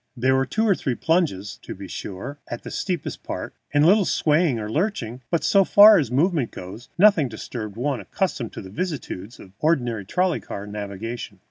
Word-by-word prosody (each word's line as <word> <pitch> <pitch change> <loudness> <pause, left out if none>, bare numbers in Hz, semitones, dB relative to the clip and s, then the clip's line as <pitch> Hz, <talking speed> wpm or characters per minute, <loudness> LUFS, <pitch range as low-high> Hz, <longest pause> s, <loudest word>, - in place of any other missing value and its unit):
There 130 +2 +3
were 135 0 +1
two 220 +8 0
or 200 - +5
three 130 -8 -2
plunges, 155 - 0
to - - -7
be 100 0 -9
sure, 105 +13 -7
at 120 - -6
the - - -7
steepest 180 -3 -3
part, - - -5 0.2
and 145 0 +3
a - - +6
little 200 +2 +5
swaying 155 -6 +2
or 105 - -4
lurching, 130 - -2
but, 170 - 0
so 195 -1 +5
far 205 +2 +8
as 140 -7 -1
movement 145 0 +1
goes, 95 +7 -10
nothing 180 -8 +5
to 110 - -8
disturb 110 -2 -6
one 135 +1 -1
accustomed 120 - -2
to - - -7
the 95 - -10
vicissitudes 130 - -5
of, - - -12
say, - - -26
ordinary 125 -9 +1
trolley 180 - 0
car 100 - -7
navigation. 105 +1 -6
130 Hz, 205 wpm, -23 LUFS, 110-175 Hz, 0.2 s, far